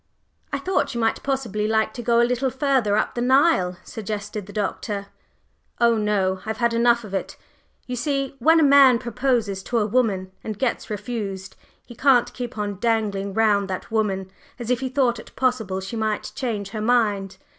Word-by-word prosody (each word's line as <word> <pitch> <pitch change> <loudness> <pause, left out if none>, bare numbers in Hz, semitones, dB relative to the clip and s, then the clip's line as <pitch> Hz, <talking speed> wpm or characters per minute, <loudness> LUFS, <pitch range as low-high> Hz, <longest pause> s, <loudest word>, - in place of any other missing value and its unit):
"I 280 - 0
thought 365 -2 -1
you - - -1
might 225 -1 +1
possibly 230 -7 -1
like 220 0 +1
to 240 - -6
go 235 0 +2
a - - +5
little 250 +2 0
further 260 -6 +1
up - - 0
the 240 - -3
Nile?" 250 - +3
suggested 210 -2 -5
the - - -9
Doctor. 205 0 -3 0.7
"Oh, 235 -1 +4
no, 200 -3 0
I've 220 0 -4
had 235 -1 +1
enough 235 0 +3
of 205 -2 -10
it! 195 - -3 0.5
You 250 - -4
see, 275 +1 -2
when 320 +7 +5
a - - +4
man 275 -3 +7
proposes 235 -4 -1
to 240 - -2
a 215 - +2
woman 205 -5 0
and 215 -2 -5
gets 255 -1 -1
refused, 205 -3 -5 0.3
he 240 - -11
can't 260 -1 +3
keep 245 -2 -6
on 205 -2 -3
dangling 205 -4 0
round 210 -3 +3
that 185 +3 -5
woman 195 -4 -1 0.3
as 240 -1 -4
if 250 - +2
he 260 0 -3
thought 250 -3 +1
it - - -13
possible 220 -7 0
she 190 +5 -6
might 220 -1 -2
change 215 -6 -3
her 215 +1 -5
mind." 210 -5 +1
225 Hz, 190 wpm, -23 LUFS, 205-250 Hz, 0.7 s, man